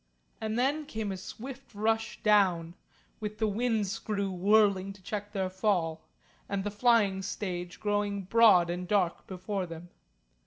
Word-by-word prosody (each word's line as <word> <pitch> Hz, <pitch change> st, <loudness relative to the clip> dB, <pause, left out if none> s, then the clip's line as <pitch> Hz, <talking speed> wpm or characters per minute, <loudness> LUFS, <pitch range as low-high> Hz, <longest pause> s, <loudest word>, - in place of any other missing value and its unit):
And 220 Hz, +1 st, -2 dB
then 285 Hz, +4 st, +1 dB
came 220 Hz, -2 st, -3 dB
a -, -, -3 dB
swift 245 Hz, +6 st, -9 dB
rush 225 Hz, +2 st, -1 dB
down, 185 Hz, -6 st, +3 dB, 0.5 s
with 210 Hz, -1 st, -5 dB
the 220 Hz, -, +1 dB
wind 220 Hz, 0 st, 0 dB
screw 200 Hz, -1 st, -2 dB
whirling 195 Hz, 0 st, +3 dB
to 195 Hz, -, -18 dB
check 205 Hz, 0 st, -5 dB
their 190 Hz, -2 st, -1 dB
fall, 185 Hz, -4 st, 0 dB, 0.5 s
and 200 Hz, -1 st, -1 dB
the 205 Hz, -, -3 dB
flying 205 Hz, -3 st, +3 dB
stage 180 Hz, -3 st, -4 dB
growing 205 Hz, -1 st, -1 dB
broad 190 Hz, -4 st, +5 dB
and 180 Hz, +1 st, -4 dB
dark 185 Hz, -3 st, 0 dB
before 190 Hz, 0 st, -3 dB
them. 165 Hz, +1 st, -9 dB
205 Hz, 150 wpm, -30 LUFS, 185-220 Hz, 0.5 s, broad